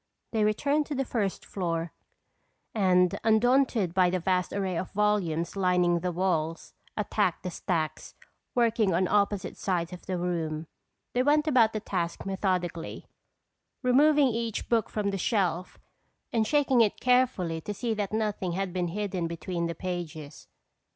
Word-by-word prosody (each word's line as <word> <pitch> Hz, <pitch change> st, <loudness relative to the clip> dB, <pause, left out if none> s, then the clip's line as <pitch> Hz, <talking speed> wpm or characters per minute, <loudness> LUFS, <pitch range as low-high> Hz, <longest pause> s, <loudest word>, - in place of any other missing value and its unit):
They 220 Hz, -2 st, +1 dB
returned 280 Hz, +8 st, +1 dB
to 295 Hz, -, -3 dB
the 270 Hz, 0 st, -1 dB
first 205 Hz, -6 st, -2 dB
floor 170 Hz, -3 st, -3 dB, 0.8 s
and 180 Hz, -4 st, +3 dB
undaunted 225 Hz, -3 st, +3 dB
by 185 Hz, -1 st, +4 dB
the 185 Hz, -, 0 dB
vast 180 Hz, +1 st, 0 dB
array 190 Hz, -2 st, -2 dB
of 180 Hz, +2 st, -3 dB
volumes 190 Hz, -6 st, 0 dB
lining 180 Hz, -2 st, +2 dB
the 180 Hz, +1 st, -2 dB
walls, 165 Hz, -3 st, -1 dB, 0.2 s
attacked 205 Hz, -3 st, 0 dB
the 180 Hz, -, -3 dB
stacks, 165 Hz, -2 st, -3 dB, 0.4 s
working 225 Hz, -6 st, +2 dB
on 185 Hz, +1 st, +2 dB
opposite 205 Hz, -1 st, 0 dB
sides 180 Hz, -2 st, -1 dB
of 180 Hz, -, -11 dB
the 185 Hz, -1 st, -1 dB
room. 165 Hz, -3 st, -2 dB, 0.5 s
They 245 Hz, -, +2 dB
went 300 Hz, +3 st, +3 dB
about 240 Hz, -7 st, +5 dB
the 215 Hz, -, -1 dB
task 175 Hz, -5 st, -3 dB
methodically, 185 Hz, -4 st, -2 dB, 0.8 s
removing 285 Hz, +2 st, +5 dB
each 230 Hz, -2 st, -3 dB
book 230 Hz, -3 st, +2 dB
from 205 Hz, -2 st, -1 dB
the 195 Hz, -, -3 dB
shelf 180 Hz, -4 st, 0 dB, 0.6 s
and 220 Hz, -2 st, +2 dB
shaking 275 Hz, -4 st, +3 dB
it 215 Hz, -3 st, +2 dB
carefully 250 Hz, -10 st, +2 dB
to 210 Hz, -, -5 dB
see 230 Hz, +3 st, -2 dB
that 205 Hz, -2 st, -2 dB
nothing 210 Hz, -5 st, -1 dB
had 190 Hz, 0 st, -2 dB
been 180 Hz, -1 st, -1 dB
hidden 185 Hz, -1 st, -2 dB
between 170 Hz, +1 st, -3 dB
the 170 Hz, -, -4 dB
pages. 155 Hz, -7 st, -6 dB
190 Hz, 150 wpm, -28 LUFS, 175-220 Hz, 0.8 s, about